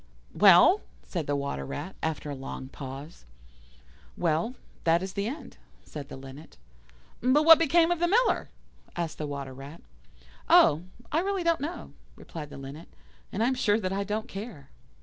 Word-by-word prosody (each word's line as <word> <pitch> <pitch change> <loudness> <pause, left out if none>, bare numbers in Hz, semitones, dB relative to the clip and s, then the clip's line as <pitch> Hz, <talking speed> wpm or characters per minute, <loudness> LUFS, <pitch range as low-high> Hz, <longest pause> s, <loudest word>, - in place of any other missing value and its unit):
'" - - -30
"Well?" 200 - +8 0.2
said 170 -5 -4
the 145 - 0
Water 140 - -3
rat, 150 - -6
after 155 -2 -3
a - - -4
long 130 0 -7
pause. 140 +4 -9 0.9
"Well, 170 +8 0 0.3
that 170 +2 +3
is 190 0 -5
the 200 +1 -2
end," 275 +7 -7 0.3
said 145 -2 -8
the - - -8
Linnet. 135 +3 -12 0.6
"But 260 +5 +4
what 325 0 +10
became 330 +2 +4
of 350 - 0
the 345 - +2
Miller?" 470 +7 +2 0.5
asked 170 -2 -3
the 150 - -3
Water 140 -2 -5
rat. 140 +5 -11 0.7
"Oh! 150 +2 +6 0.3
I 310 - +2
really 385 0 -1
don't 335 -4 +2
know," 315 +5 -5 0.2
replied 150 -3 -9
the - - -10
Linnet; 140 +4 -9 0.4
"and 215 - -1
I - - +3
am 260 - +2
sure 220 -4 +2
that 185 -3 -2
I 200 +1 -1
don't 215 +3 -3
care." 195 - -8
175 Hz, 175 wpm, -28 LUFS, -, 0.9 s, what